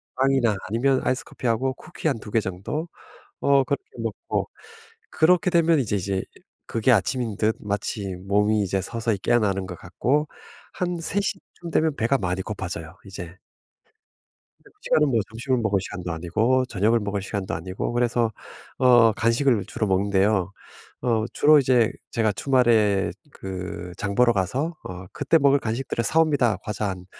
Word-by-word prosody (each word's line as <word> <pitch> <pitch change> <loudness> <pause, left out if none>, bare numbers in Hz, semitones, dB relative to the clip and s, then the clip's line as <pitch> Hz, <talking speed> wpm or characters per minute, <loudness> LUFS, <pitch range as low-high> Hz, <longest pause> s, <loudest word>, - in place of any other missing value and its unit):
빵이나 130 -4 +2
아니면 130 +6 +1
아이스 130 - 0
커피하고 125 +2 -1
쿠키 170 0 -6
한 135 -6 0
2 105 - -10
개 115 - +3
정도? 100 - -4 0.5
어 140 -1 +4
그렇게 390 - -2
먹고. - - -3 0.6
그렇게 180 +4 +3
되면 170 -2 +4
이제 105 -5 -1
이제 95 0 -2 0.4
그게 115 +3 +2
아침인 115 +1 +1
듯 110 +1 +1
마치 100 -1 -3
몸이 105 +3 +1
이제 95 0 0
서서히 115 +1 -2
깨어나는 100 -3 +1
것 90 -2 -7
같고 135 - 0 0.5
한 180 -1 -2
3:00 200 +3 -1 0.2
쯤 170 -1 -6
되면 155 -2 +1
배가 115 +5 +2
많이 90 -2 -2
고파져요 90 -4 -6
이제. 90 -2 -8 1.2
근데 - - -21
그 - - -40
시간은 150 -1 +3
뭐 120 -4 +2
점심을 125 +3 -1
먹을 105 -3 +1
시간도 90 -2 -6
아니고 110 +11 +1
저녁을 115 +1 +1
먹을 100 -1 -3
시간도 95 -2 -3
아니고 95 +7 -4
그래서 120 -1 +1 0.5
어 120 -3 +6
간식을 115 0 +2
주로 110 - -2
먹는데요. 95 0 +1 0.5
어 115 -3 +1
주로 150 +1 +6
이제 125 -4 +3 0.2
제가 110 -2 +1
주말에 115 -6 +2 0.2
그 95 -1 -6 0.2
장 100 0 -3
보러 120 +2 +5
가서 125 - -1
어 90 0 -8
그때 165 - +2
먹을 140 -1 +4
간식들을 115 +1 -2
사 160 - +3
옵니다. 140 -9 +2
과자 105 -1 -3
한 95 -2 -5
110 Hz, 320 characters per minute, -24 LUFS, 100-130 Hz, 1.2 s, 어